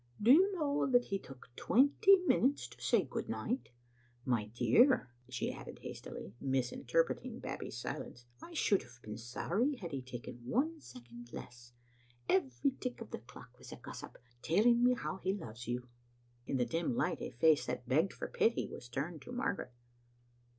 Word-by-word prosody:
'* - - -28
Do 225 +4 +5
you 370 +8 +7
know 290 -5 +1
that 245 -1 +5
he 195 -1 -2
took 130 -7 -13
twenty 285 - +5
minutes 280 -3 +3
to - - -16
say - - +3
good - - -5
night? 250 +4 -2 0.6
My 120 -5 +1
dear," 125 - +4 0.2
she 125 -1 -2
added - - -10
hast - - -7
ily, 100 - -8
misinterpreting 135 - 0
Babbie's - - -5
silence, 120 0 -6 0.2
"I 340 - -10
should 205 -10 +3
have 120 0 -15
been 105 0 -6
sorry 195 - 0
had 180 -9 -7
he 135 -2 -3
taken 125 -1 -8
one 300 - 0
second 120 - -12
less. 120 0 -10 0.5
Every 135 - +2
tick 250 -1 -4
of 230 - -9
the - - -4
clock 120 0 -14
was - - -11
a - - -6
gossip, - - -9 0.2
telling 235 +8 +4
me 250 0 +5
how 215 - -4
he 190 0 -1
loves 120 - -8
you." 125 +1 -3 0.6
In 135 - 0
the 125 - +2
dim 165 +1 -1
light - - 0
a - - -3
face 155 +4 +3
that 125 0 -3
begged 160 +9 +3
for - - -5
pity 230 - +1
was 120 - -9
turned 150 +6 -3
to - - -10
Margaret. 245 - -2
155 Hz, 180 wpm, -34 LUFS, -, 0.6 s, you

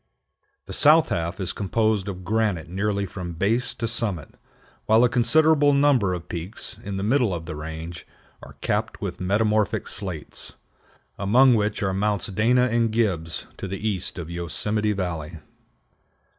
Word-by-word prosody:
The - - -7
south 155 +2 +5
half 85 +3 -2
is 95 -2 -2
composed 105 0 0
of 95 -2 -6
granite 100 -4 0
nearly 100 +3 -1
from 90 -2 -6
base 115 +7 +1
to 115 - -3
summit, 105 - -2 0.5
while 110 +2 +5
a 125 - +4
considerable 145 +4 +4
number 135 -10 +3
of 85 -1 -8
peaks, 90 +6 -6
in 100 -1 -4
the 95 - -3
middle 120 0 +2
of 85 -2 -4
the 80 -2 -6
range, 80 +3 -7 0.3
are - - -12
capped - - -1
with - - -5
metamorphic 105 +2 +1
slates, 95 -6 -7 0.7
among 125 +6 +5
which 105 0 0
are 95 -1 0
Mounts 100 0 0
Dana 115 +6 +3
and 115 -1 +1
Gibbs 90 -8 -1
to 100 - -5
the 95 +3 -4
east 95 -4 -2
of 85 -3 -5
Yosemite 105 +5 0
Valley. 85 -4 -4
100 Hz, 155 wpm, -24 LUFS, 90-115 Hz, 0.7 s, south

